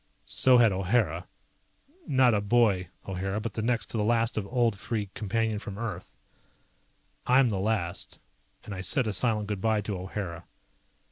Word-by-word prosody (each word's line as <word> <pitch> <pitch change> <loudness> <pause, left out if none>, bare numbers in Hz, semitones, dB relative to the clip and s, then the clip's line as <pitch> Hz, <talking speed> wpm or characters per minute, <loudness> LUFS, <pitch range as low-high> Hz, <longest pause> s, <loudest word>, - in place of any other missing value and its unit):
So 130 -1 +4
had 115 -3 +6
O'Hara. 95 -3 0 0.8
Not 130 -3 +4
a 105 - +2
boy, 100 -5 +2 0.2
O'Hara, 95 +2 -2
but 115 +1 -4
the 110 - -3
next 115 +1 0
to - - -2
the 105 - +1
last 115 +1 +1
of 105 -2 -2
old 120 -4 +1
Free 105 -2 -3
Companion 110 0 -1
from 100 -1 -7
Earth. 105 -6 -6 1.1
I'm 125 0 +5
the 100 -3 -1
last, 95 -4 -2 0.5
and 105 - -7
I 95 - -5
said 130 +6 +1
a 110 - -1
silent 105 +1 +1
good 105 -3 -3
bye 110 -1 +2
to 105 0 -4
O'Hara. 90 -2 -5
105 Hz, 165 wpm, -28 LUFS, 95-115 Hz, 1.1 s, had